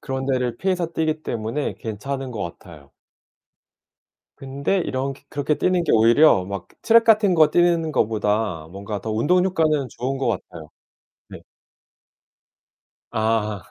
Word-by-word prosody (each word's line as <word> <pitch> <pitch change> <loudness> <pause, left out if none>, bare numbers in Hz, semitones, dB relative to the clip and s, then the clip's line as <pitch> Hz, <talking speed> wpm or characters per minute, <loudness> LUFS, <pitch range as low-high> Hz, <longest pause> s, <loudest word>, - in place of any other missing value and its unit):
그런 130 0 -4
데를 125 -3 -1
피해서 185 -2 0
뛰기 155 -1 -1
때문에 115 +4 -3
괜찮은 130 +5 -5
것 110 -4 -5 0.2
같아요. 75 -6 -15 1.5
근데 140 +7 -2
이렁케 135 -4 -3
그렇게 145 +1 -1
뛰는 180 -1 +1
게 160 - 0
오히려 115 -2 +5
막 100 -2 -6
트랙 230 0 +5
같은 215 -4 +4
거 155 -2 +5
뛰는 170 -2 +2
것보다 105 - -1
뭔가 100 +1 -6
더 110 - -4
운동 170 +12 +2
효과는 155 -7 +1
좋은 135 +2 -4
것 135 - -2
같아요. 80 -3 -6 0.6
네. - - -10 1.7
아. 110 -2 -1
135 Hz, 265 characters per minute, -22 LUFS, 110-160 Hz, 1.7 s, 오히려